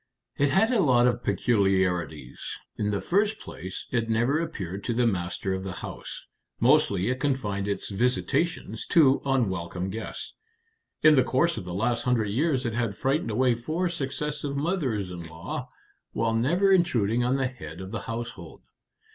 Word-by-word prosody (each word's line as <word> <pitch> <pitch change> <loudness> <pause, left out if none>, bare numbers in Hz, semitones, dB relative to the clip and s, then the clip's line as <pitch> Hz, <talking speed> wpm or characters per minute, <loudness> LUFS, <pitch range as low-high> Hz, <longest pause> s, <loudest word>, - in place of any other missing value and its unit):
"It 145 0 +2
had 210 - +3
a 240 - +3
lot 125 -6 +4
of 120 -1 +2
peculiarities. 90 - 0 0.2
In 105 - -1
the 100 -2 -1
first 205 - +1
place, 95 +1 -7
it 115 -2 0
never 120 +7 +2
appeared 100 - -5
to 120 - -1
the 125 +1 +3
master 95 -2 -1
of 95 0 -3
the 95 -1 -4
house. - - -8 0.3
Mostly 120 -7 +3
it 130 - -2
confined 105 -9 -1
its 100 - -2
visitations 125 - 0
to 140 -5 +5
unwelcome 95 -8 -1
guests. 110 +3 -6 0.7
In 155 0 +8
the 130 -3 +5
course 165 +7 +2
of 95 - -6
the 90 - -5
last 115 +4 0
hundred 120 -4 +1
years 135 +2 +1
it 115 - -1
had 115 -3 -1
frightened 135 -1 0
away 125 +3 +3
four 155 +10 -1
successive 145 -2 -3
mothers 140 - -1
in 85 -2 -7
law, 80 +1 -6 0.4
while 115 0 0
never 170 - +3
intruding 120 - +3
on 125 +2 +2
the 135 -1 +1
head 85 -11 -7
of 95 0 -7
the 110 - -3
household." 115 -7 -6
120 Hz, 165 wpm, -27 LUFS, 100-140 Hz, 0.7 s, In